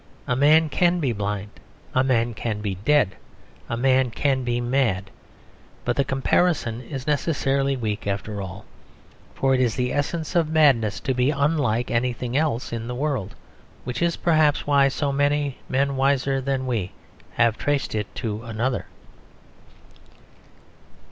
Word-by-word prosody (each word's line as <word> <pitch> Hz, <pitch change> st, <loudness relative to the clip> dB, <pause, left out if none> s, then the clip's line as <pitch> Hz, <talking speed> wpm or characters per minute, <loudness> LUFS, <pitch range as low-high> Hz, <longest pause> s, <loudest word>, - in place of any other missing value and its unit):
A 125 Hz, -, 0 dB
man 155 Hz, +4 st, +5 dB
can 175 Hz, +4 st, +2 dB
be 135 Hz, -7 st, 0 dB
blind; 105 Hz, 0 st, -3 dB, 0.4 s
a 130 Hz, -, +3 dB
man 120 Hz, -3 st, +1 dB
can 110 Hz, -1 st, -3 dB
be 105 Hz, -2 st, -2 dB
dead; 105 Hz, +2 st, +2 dB, 0.5 s
a 115 Hz, -, -2 dB
man 130 Hz, 0 st, +3 dB
can 135 Hz, +2 st, 0 dB
be 120 Hz, 0 st, -1 dB
mad. 120 Hz, -6 st, 0 dB, 0.7 s
But 120 Hz, -, 0 dB
the 140 Hz, -, +2 dB
comparison 135 Hz, -3 st, +1 dB
is 130 Hz, +1 st, -7 dB
necessarily 140 Hz, -2 st, 0 dB
weak, 105 Hz, -4 st, -3 dB
after 100 Hz, +1 st, -3 dB
all. 95 Hz, +2 st, -8 dB, 0.7 s
For 135 Hz, 0 st, +2 dB
it 130 Hz, -, +2 dB
is 120 Hz, -3 st, +1 dB
the 125 Hz, -1 st, -1 dB
essence 155 Hz, +4 st, -2 dB
of 165 Hz, -3 st, +2 dB
madness 140 Hz, -10 st, +3 dB
to 130 Hz, -, -1 dB
be 125 Hz, +1 st, +2 dB
unlike 140 Hz, -5 st, +1 dB
anything 120 Hz, +1 st, -1 dB
else 145 Hz, -6 st, 0 dB
in 115 Hz, 0 st, -4 dB
the 125 Hz, -, -4 dB
world: 130 Hz, -8 st, -2 dB, 0.5 s
which 125 Hz, +4 st, -4 dB
is 170 Hz, -1 st, +2 dB
perhaps 155 Hz, -3 st, +2 dB
why 140 Hz, -1 st, +4 dB
so 140 Hz, +1 st, -1 dB
many 145 Hz, 0 st, 0 dB
men 140 Hz, +1 st, +1 dB
wiser 135 Hz, 0 st, +1 dB
than 135 Hz, 0 st, -1 dB
we 110 Hz, -8 st, -2 dB, 0.4 s
have 115 Hz, -1 st, +3 dB
traced 145 Hz, -2 st, -1 dB
it 105 Hz, -2 st, -2 dB
to 110 Hz, -3 st, -3 dB
another. 115 Hz, +2 st, -2 dB
130 Hz, 150 wpm, -24 LUFS, 115-145 Hz, 0.7 s, man